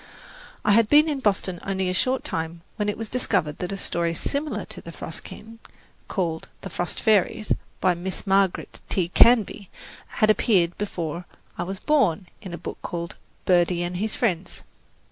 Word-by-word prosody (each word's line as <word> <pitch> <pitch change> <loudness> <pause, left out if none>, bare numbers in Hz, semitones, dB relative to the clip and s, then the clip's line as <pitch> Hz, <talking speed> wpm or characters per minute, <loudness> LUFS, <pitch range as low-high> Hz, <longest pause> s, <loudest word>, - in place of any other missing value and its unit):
I 210 - +5
had 215 +1 +5
been 300 +2 +7
in 295 -3 -1
Boston 195 -6 0
only 190 -1 -1
a 180 - 0
short 255 +8 +1
time 165 +1 -3 0.2
when 210 -1 0
it 205 - -2
was 225 - -4
discovered 180 -11 0
that 180 - -3
a 195 - -3
story 170 -2 -1
similar 290 - -2
to - - -9
"The - - -9
Frost - - -7
King," 225 +1 -11 0.5
called 165 -5 -2
"The 195 - -7
Frost 175 +1 -2
Fairies" 215 0 +3 0.3
by 185 - +3
Miss 180 +2 -5
Margaret 195 -1 +1
T. 175 -3 0
Canby, 215 -2 +5 0.4
had 215 0 +3
appeared 180 -6 +3
before 175 -4 -3 0.3
I - - -4
was 190 +2 -3
born 210 - +2 0.2
in 190 - -8
a 170 - -4
book - - -7
called 170 -1 -4 0.3
"Birdie 175 -1 +3
and 175 0 -3
His 215 +3 -1
Friends." 185 -7 -1
190 Hz, 175 wpm, -25 LUFS, 175-215 Hz, 0.5 s, been